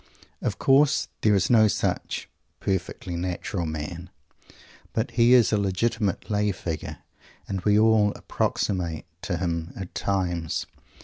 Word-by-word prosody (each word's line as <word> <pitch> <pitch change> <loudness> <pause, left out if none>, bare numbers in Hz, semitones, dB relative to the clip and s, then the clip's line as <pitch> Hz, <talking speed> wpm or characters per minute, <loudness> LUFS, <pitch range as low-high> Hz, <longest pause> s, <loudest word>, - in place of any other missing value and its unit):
Of - - -2
course, 140 +2 +4
there 105 -2 +4
is 95 - +2
no 110 -2 +7
such - - -2 0.3
"perfectly 90 -1 -3
natural 90 0 -3
man," 80 +3 -5 0.8
but 110 - -1
he 120 +1 +5
is 120 -3 +4
a 105 - +3
legitimate 100 +1 0
lay 105 -1 +1
figure, 85 -4 -5 0.5
and 95 -2 -3
we 105 +2 +3
all 110 -1 +5
approximate 85 -5 -2 0.2
to 100 -5 -2
him 85 -1 -2
at 95 -2 -7
times. 90 -4 -1
95 Hz, 130 wpm, -25 LUFS, 85-110 Hz, 0.8 s, no